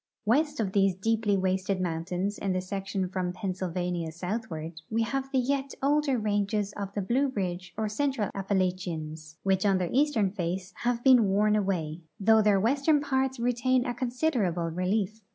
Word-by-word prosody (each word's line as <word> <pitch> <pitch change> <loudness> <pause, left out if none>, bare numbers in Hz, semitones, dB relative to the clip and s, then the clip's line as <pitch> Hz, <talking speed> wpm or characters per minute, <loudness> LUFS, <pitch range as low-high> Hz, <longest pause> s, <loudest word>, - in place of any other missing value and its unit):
West 295 +6 +2
of 205 -4 0
these 195 -2 +3
deeply 215 +1 +1
wasted 190 0 0
mountains 180 +3 -2
in 195 -2 -1
the 185 - 0
section 195 0 -3
from 180 -1 -2
Penn 190 0 -3
sylvania 180 -2 -3
southward 170 -3 -5
we 225 +1 +1
have 270 +3 -3
the 270 - +1
yet 270 +2 0
older 285 -1 +2
ranges 205 -1 0
of 200 -1 -4
the 205 - -1
Blue 260 +8 +2
Ridge 185 -2 -3
or 220 -1 0
Central 220 -1 -1
Appalachians, 180 -5 -2
which 190 -1 +2
on 195 -2 +3
their 180 -2 -2
eastern 260 -8 +2
face 185 -1 -3
have 240 0 -1
been 255 -4 +7
worn 210 +2 +3
away, 175 -6 -1 0.2
though 220 +2 +5
their 205 -2 +4
western 280 +8 +3
parts 265 -2 0
retain 245 +1 +1
a 245 - -1
consider 255 +1 0
able 170 -1 -1
relief. 195 +5 -1
200 Hz, 170 wpm, -28 LUFS, 185-240 Hz, 0.2 s, been